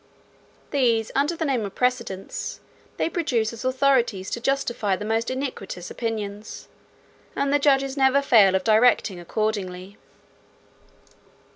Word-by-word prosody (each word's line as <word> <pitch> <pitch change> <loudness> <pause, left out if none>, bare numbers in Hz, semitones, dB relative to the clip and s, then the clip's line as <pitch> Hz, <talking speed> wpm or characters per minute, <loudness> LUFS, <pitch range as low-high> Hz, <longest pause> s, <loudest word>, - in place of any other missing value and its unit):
These, 235 -5 +1
under 290 +5 +1
the 325 - -2
name 260 -6 0
of 200 -1 -6
precedents, 235 -7 -2 0.4
they - - +1
produce 250 -11 -1
as 230 - -8
authorities 255 -7 +1
to - - -2
justify 240 -6 0
the 205 - -6
most 225 +1 0
iniquitous 255 -9 -5
opinions; 215 -2 -5 0.7
and 280 0 0
the 290 - +4
judges 275 -1 +2
never 270 +1 +3
fail 205 -8 +5
of 190 - 0
directing 220 -3 +3
accordingly. 195 0 -3
230 Hz, 125 wpm, -24 LUFS, 205-270 Hz, 0.7 s, fail